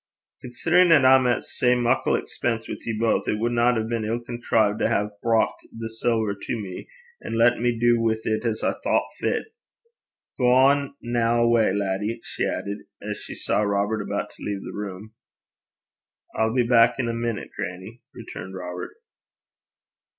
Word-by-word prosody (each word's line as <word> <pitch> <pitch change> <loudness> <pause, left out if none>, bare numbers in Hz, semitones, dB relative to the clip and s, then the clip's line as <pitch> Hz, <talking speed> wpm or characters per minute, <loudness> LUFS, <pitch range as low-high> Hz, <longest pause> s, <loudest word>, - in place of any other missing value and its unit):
'Considerin' 170 +8 +3
'at 140 -5 +6
I'm 130 -1 +6
at 120 - +1
sae 125 0 +1
muckle 120 -1 +2
expense 115 -2 -2
wi' - - -4
ye 110 -2 -2
baith, 115 0 +1
it 105 - 0
wadna 120 +2 +2
hae 110 -1 -1
been 115 -1 -2
ill 115 +2 -1
contrived 115 -3 0
to - - +2
hae 105 -2 +1
brocht 115 -1 +1
the 115 0 -6
siller 110 -2 0
to 100 +4 -5
me, 95 -3 -7 0.4
an' - - -4
latten 120 +1 +4
me 120 -1 +1
du 120 0 +3
wi' 115 -1 +2
't 110 0 -2
as 115 -2 -2
I - - +2
thocht - - 0
fit. 440 - -2 0.9
Gang 135 +3 +4
na 120 0 +1
awa', 115 -3 +3
laddie,' 100 +3 -2
she - - -3
added, 100 +1 -3 0.2
as - - -5
she - - -9
saw - - 0
Robert 100 +1 0
about - - -3
to - - -14
leave 100 -1 -3
the - - -7
room. 105 +1 -7 1.2
'I'll 110 +2 0
be 125 - +4
back 115 0 +5
in 130 -3 -1
a 115 - -1
minute, 115 -2 -3
grannie,' 95 +7 -6
returned 95 +1 -8
Robert. 90 -1 -6
115 Hz, 170 wpm, -24 LUFS, 105-120 Hz, 1.2 s, at